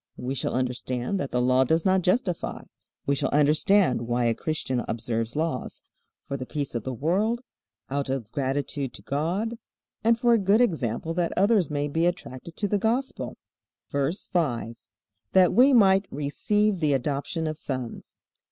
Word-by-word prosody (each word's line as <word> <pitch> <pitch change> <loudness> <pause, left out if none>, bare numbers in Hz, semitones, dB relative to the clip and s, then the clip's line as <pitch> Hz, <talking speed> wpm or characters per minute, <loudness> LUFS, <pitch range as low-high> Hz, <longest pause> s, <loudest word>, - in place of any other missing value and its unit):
We 125 +2 -3
shall 135 - -2
understand 125 +5 -2
that 140 - -2
the 125 - 0
Law 130 +1 +4
does 160 +5 +1
not 190 0 +4
justify. 180 -1 0 0.4
We 140 - +2
shall 140 - 0
understand 150 - +3
why 120 0 +1
a 115 - +3
Christian 130 -2 -2
observes 115 +1 -2
laws: 155 -5 -3 0.4
For 140 - -3
the 130 -1 -6
peace 145 -3 -3
of 120 - -2
the 130 - -3
world, 190 - 0 0.5
out 140 0 -2
of 125 -5 -3
gratitude 140 -1 -2
to - - -11
God, 185 +11 -2 0.4
and 230 +1 +4
for 240 -1 +4
a 230 - +4
good 200 +3 +3
example 160 - 0
that 170 0 -1
others 200 -3 +3
may 145 -1 -1
be 165 +4 +1
attracted 170 -2 -5
to 205 - 0
the 205 +1 +1
Gospel. 240 +6 -1 0.5
VERSE 140 +6 -1
5. 120 -9 -1 0.6
That 185 -1 +5
we 260 +4 +6
might 195 -5 +5
receive 195 +8 0
the 150 -3 +2
adoption 145 +5 -1
of 155 0 -2
sons. 130 -4 -6
150 Hz, 165 wpm, -26 LUFS, 130-190 Hz, 0.6 s, we